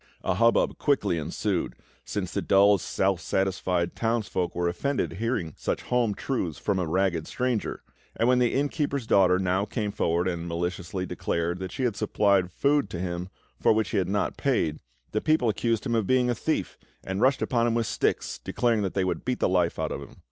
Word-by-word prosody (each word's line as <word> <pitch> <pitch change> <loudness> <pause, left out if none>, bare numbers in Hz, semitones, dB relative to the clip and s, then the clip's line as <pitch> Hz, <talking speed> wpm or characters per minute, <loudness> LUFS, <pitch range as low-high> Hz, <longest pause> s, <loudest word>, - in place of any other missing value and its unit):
A - - +1
hubbub 115 +5 +2
quickly 105 - +1
ensued, 75 - -2 0.3
since - - -4
the - - -1
dull, 100 0 +5
self 95 +1 0
satisfied 90 -2 0
townsfolk 110 -6 -1
were 85 0 0
offended 130 +11 -1
at - - -9
hearing 110 - -1
such - - -3
home 120 -4 +1
truths 90 - -2
from 100 -2 -1
a 90 - -1
ragged 85 -1 0
stranger; 125 -4 -2 0.3
and 115 - +1
when 125 0 +4
the 120 -2 +3
inn 140 +2 +2
keeper's 140 -4 -2
daughter 95 -4 +4
now 95 +1 +1
came 105 0 -2
forward 85 -2 0
and 85 -2 -3
maliciously 90 +2 -3
declared 85 0 -2
that 95 -1 -5
she 130 - -3
had 120 -5 +1
supplied 100 -3 +2
food 140 +8 +1
to 85 - -5
him 90 0 -3 0.3
for - - +4
which 110 0 0
he - - 0
had 95 - -1
not 100 +1 -1
paid, 85 - 0 0.3
the 110 - 0
people 155 -7 +2
accused 115 +1 0
him 120 - -1
of 110 -4 +1
being 125 -1 +3
a - - +2
thief, 155 +7 -2 0.2
and 95 +2 -3
rushed 130 +1 +3
upon 120 -2 +1
him 115 - +1
with 115 -1 +1
sticks, - - -1
declaring 115 -3 0
that 95 -2 -2
they 95 - +2
would 95 - -2
beat 125 0 -1
the - - +2
life 90 -2 +1
out - - -2
of - - -4
him. - - -12
100 Hz, 205 wpm, -27 LUFS, 90-120 Hz, 0.3 s, dull